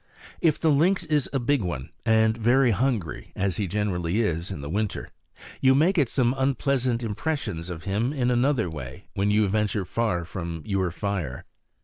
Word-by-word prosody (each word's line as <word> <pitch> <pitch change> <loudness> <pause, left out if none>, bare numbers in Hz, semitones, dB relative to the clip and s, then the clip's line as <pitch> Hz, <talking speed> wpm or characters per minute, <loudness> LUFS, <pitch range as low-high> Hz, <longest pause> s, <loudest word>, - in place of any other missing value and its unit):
If 160 -3 +3
the 160 - +3
lynx 175 +6 +3
is 150 -4 0
a 140 - 0
big 135 +1 +1
one, 75 -9 -4 0.2
and 110 0 +4
very 120 +2 +3
hungry, 115 - -1
as 95 -2 0
he 105 - -1
generally 95 -1 -1
is 85 -4 -1
in 95 -8 -5
winter, 105 0 -2 0.5
you 130 0 +5
may 160 +7 +4
get 145 -10 +2
some 125 -2 +2
unpleasant 130 -3 +1
impressions 105 - -3
of 85 -2 -6
him 105 +7 0
in 125 -4 0
another 125 -3 +2
way 65 -7 -8
when 100 +1 0
you 105 0 +3
venture 105 -1 0
far 90 -4 -1
from 85 -2 -5
your 95 -3 0
fire. 85 -7 -3
110 Hz, 170 wpm, -25 LUFS, 90-130 Hz, 0.5 s, you